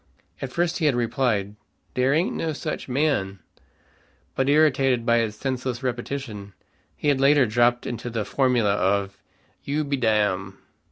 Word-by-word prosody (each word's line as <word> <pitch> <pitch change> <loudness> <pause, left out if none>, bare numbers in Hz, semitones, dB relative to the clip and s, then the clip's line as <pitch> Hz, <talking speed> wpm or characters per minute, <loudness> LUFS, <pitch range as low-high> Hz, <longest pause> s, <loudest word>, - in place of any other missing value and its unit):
At 135 - -4
first 170 +4 0
he 155 - +2
had 140 - +2
replied, 115 -4 0 0.4
"Dere 130 +1 +2
ain't 170 +4 0
no 160 -1 -2
such 150 -2 -5
man;" 125 -8 0 1.0
but 135 +1 0
irritated 135 -5 +3
by 120 -1 +3
its 110 -2 -1
senseless 130 0 -3
repetition, 120 -5 -4 0.4
he 150 - -1
had 135 -2 +2
latterly 140 -1 +5
dropped 120 +2 +2
into 120 0 -4
the 115 -3 -3
formula 120 -3 +2
of, 100 0 0 0.4
"You 150 +2 -1
be 140 -1 -2
dam." 105 -5 0
125 Hz, 150 wpm, -24 LUFS, 105-140 Hz, 1.0 s, latterly